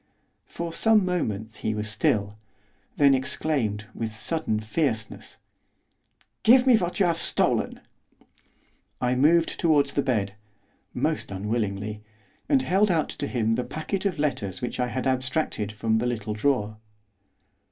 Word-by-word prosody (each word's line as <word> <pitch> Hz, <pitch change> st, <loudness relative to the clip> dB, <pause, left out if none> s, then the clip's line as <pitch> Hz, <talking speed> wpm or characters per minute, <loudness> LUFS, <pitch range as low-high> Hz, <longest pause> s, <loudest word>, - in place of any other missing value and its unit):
For 170 Hz, -1 st, -5 dB
some 220 Hz, +1 st, +4 dB
moments 110 Hz, -, -2 dB
he 110 Hz, 0 st, -2 dB
was 105 Hz, 0 st, -3 dB
still; 105 Hz, 0 st, 0 dB, 0.6 s
then 140 Hz, -1 st, +6 dB
exclaimed, 130 Hz, -5 st, -1 dB
with 110 Hz, -1 st, -4 dB
sudden 135 Hz, -2 st, -1 dB
fierceness, 110 Hz, -1 st, -3 dB, 1.0 s
'Give 250 Hz, +3 st, +6 dB
me 255 Hz, -2 st, +7 dB
what 180 Hz, -2 st, -1 dB
you 195 Hz, -, +4 dB
have 170 Hz, -1 st, +1 dB
stolen!' -, -, 0 dB, 1.2 s
I 125 Hz, 0 st, +1 dB
moved 160 Hz, +6 st, +3 dB
towards 145 Hz, -4 st, +3 dB
the 140 Hz, -, +2 dB
bed 105 Hz, -7 st, -1 dB, 0.6 s
most -, -, -1 dB
unwillingly 105 Hz, +1 st, -3 dB, 0.5 s
and 275 Hz, -3 st, +4 dB
held 200 Hz, +1 st, +3 dB
out 165 Hz, -4 st, +1 dB
to 145 Hz, -, -4 dB
him 115 Hz, -4 st, 0 dB
the 125 Hz, -, 0 dB
packet 170 Hz, +8 st, -4 dB
of 180 Hz, -, -3 dB
letters 125 Hz, -11 st, -2 dB
which 125 Hz, -, -4 dB
I 125 Hz, -, +1 dB
had 130 Hz, +1 st, -3 dB
abstracted 130 Hz, -4 st, -1 dB
from 110 Hz, +1 st, 0 dB
the 120 Hz, -, 0 dB
little 110 Hz, -3 st, -3 dB
drawer. 110 Hz, -2 st, 0 dB
125 Hz, 140 wpm, -26 LUFS, 110-160 Hz, 1.2 s, me